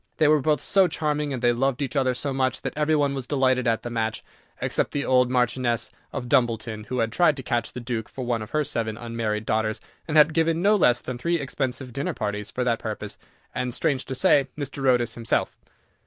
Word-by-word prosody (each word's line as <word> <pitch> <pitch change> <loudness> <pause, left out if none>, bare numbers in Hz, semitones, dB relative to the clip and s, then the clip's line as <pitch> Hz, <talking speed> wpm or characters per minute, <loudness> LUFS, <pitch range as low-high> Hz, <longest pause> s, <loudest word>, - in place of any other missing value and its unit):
They 155 - +4
were 150 -1 +4
both 150 +2 +1
so 195 -2 +4
charming, 150 -2 -1
and 130 -2 -4
they 120 0 +4
loved 135 +1 0
each 140 0 -3
other 130 -2 +2
so 140 +2 -2
much, 130 -1 0
that - - -3
every 155 +1 +2
one 145 -2 +2
was 135 -3 -4
delighted 130 -3 +2
at 115 -1 +1
the 120 - -5
match, 110 -1 -2 0.4
except - - -1
the 145 - -1
old 125 -1 +4
Marchioness 120 -2 0 0.2
of 130 -3 -5
Dumbleton, 115 -4 0
who 125 - -4
had 115 -2 0
tried 160 +2 +3
to 130 - -6
catch 120 -2 -1
the - - -6
Duke 115 -3 -4
for 130 - -6
one 120 -2 0
of 110 - -7
her 155 0 +1
seven 115 -5 -3
unmarried 115 -2 -3
daughters, 110 0 0 0.3
and 155 -1 +1
had 150 +1 +6
given 165 0 +2
no 205 +4 +4
less 125 - +3
than 125 -1 -6
three 170 +6 0
expensive 130 -2 -3
dinner 140 +3 -2
parties 105 0 -3
for 125 - -2
that 120 -2 +1
purpose, 105 -1 -5 0.3
and, 125 -1 -2
strange 140 -5 0
to 130 - -4
say, 135 +2 +4
Mr. 140 -1 -5
Otis 120 -2 +2
himself. 115 -1 -1
125 Hz, 225 wpm, -25 LUFS, 115-145 Hz, 0.4 s, had